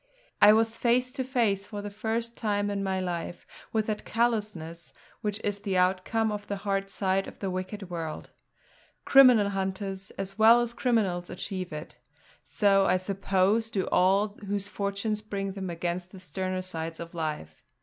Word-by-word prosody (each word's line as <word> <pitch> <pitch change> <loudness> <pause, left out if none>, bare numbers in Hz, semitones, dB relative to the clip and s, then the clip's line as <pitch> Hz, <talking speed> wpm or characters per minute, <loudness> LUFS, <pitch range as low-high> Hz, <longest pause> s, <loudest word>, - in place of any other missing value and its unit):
I 205 - +10
was 225 +1 +2
face 250 +2 +2
to 265 0 -3
face, 225 -7 0
for 205 -2 -6
the 205 - -5
first 230 +3 -2
time 205 -2 0
in 200 -1 -2
my 190 -1 0
life, 175 -1 -4 0.3
with 220 -1 +1
that 215 -1 -3
callousness 210 -8 -1 0.3
which 210 -1 -2
is 205 -1 -1
the 195 -2 -1
outcome 190 +5 +2
of 205 -1 -5
the 200 - -2
hard 195 -1 0
side 195 -1 0
of - - -10
the 195 -2 -3
wicked 185 +1 -5
world. 165 -3 -5 0.7
Criminal 250 -7 +7
hunters, 195 0 -3
as 195 +2 -5
well 225 +2 +8
as 240 -1 -2
criminals, 205 -9 0
achieve 185 0 -5
it; 150 +1 -8 0.5
so 195 -2 +3
I - - +4
suppose 195 +3 +1
do 195 -4 -1
all 195 +3 +4 0.2
whose 200 0 -2
fortunes 205 +1 -2
bring 200 -2 -3
them 190 -1 -5
against 175 +1 -3
the 190 - -12
sterner 185 +1 -3
sides 165 -2 -5
of 170 +1 -7
life. 155 - -4
195 Hz, 170 wpm, -28 LUFS, 185-215 Hz, 0.7 s, I